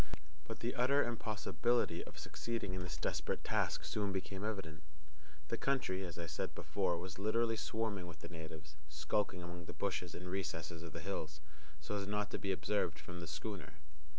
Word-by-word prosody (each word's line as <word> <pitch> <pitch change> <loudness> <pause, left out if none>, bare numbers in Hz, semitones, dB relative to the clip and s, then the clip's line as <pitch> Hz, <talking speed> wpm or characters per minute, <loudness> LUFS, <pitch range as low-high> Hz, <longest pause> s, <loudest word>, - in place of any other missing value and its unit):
But 115 - -4
the 120 +1 +1
utter 135 +3 +6
impossibility 110 -4 +2
of - - -9
succeeding 115 -5 -1
in 95 - -1
this 85 -3 -3
desperate - - 0
task - - +2
soon 100 -2 +1
became 95 +1 -2
evident. 95 -8 -2 0.7
The 115 - +1
country, 110 -9 +2
as 85 -3 -4
I 85 - -1
said 85 - -2
before, 85 - +2
was 90 +2 -5
literally 115 +3 +4
swarming 110 -4 0
with 85 - -8
the - - -4
natives, 80 -2 -7
skulking 90 +5 +1
among 85 0 -5
the - - -5
bushes 90 -2 0
and 90 - -4
recesses 85 -3 -1
of 85 -1 -6
the - - -3
hills, 80 -5 -2 0.4
so 80 +7 -1
as 100 -1 -1
not 105 0 +1
to - - -1
be 100 - +1
observed 95 -4 +2
from 90 0 -6
the 85 - -4
schooner. 95 -1 -3
95 Hz, 180 wpm, -39 LUFS, 85-105 Hz, 0.7 s, utter